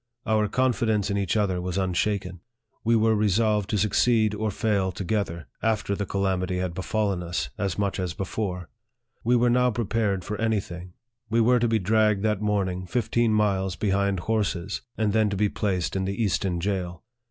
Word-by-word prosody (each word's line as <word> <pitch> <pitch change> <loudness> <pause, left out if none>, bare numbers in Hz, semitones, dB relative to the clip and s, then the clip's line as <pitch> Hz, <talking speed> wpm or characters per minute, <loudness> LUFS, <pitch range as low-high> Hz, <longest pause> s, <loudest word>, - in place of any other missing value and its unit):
Our 110 -1 +2
confidence 110 -4 +1
in 100 - 0
each 100 +2 0
other 95 -4 +1
was 90 0 -3
unshaken. 95 -1 -1 0.4
We 115 +1 +3
were 110 0 +3
resolved 105 0 +2
to 105 - +1
suc 105 +1 +1
ceed 110 -2 +3
or 110 +1 -1
fail 100 -2 0
together, 90 -4 -2 0.2
after 110 -2 0
the 100 -1 -3
calamity 95 -2 -1
had 90 -1 -2
befallen 100 0 -1
us 85 0 -3
as 100 -3 -1
much 100 -1 -1
as 90 -3 -3
before. 95 -2 -3 0.6
We 120 +2 +3
were 120 0 +3
now 125 +1 +4
prepared 110 -4 -1
for 105 +1 -4
any 110 -2 +2
thing. 90 -1 -9 0.4
We 115 +1 +2
were 120 +2 +4
to 120 - +2
be 115 0 +2
dragged 105 0 +2
that 105 -2 +1
morning 95 -3 -1
fifteen 115 +1 +1
miles 95 -4 +1
behind 100 -1 0
horses, 100 -3 -1 0.2
and 105 -2 +1
then 110 -1 +3
to 100 - -2
be 105 +1 +2
placed 95 -5 -1
in 95 0 0
the 100 +2 -3
Easton 95 -3 0
jail. 90 -2 -3
100 Hz, 185 wpm, -25 LUFS, 95-110 Hz, 0.6 s, now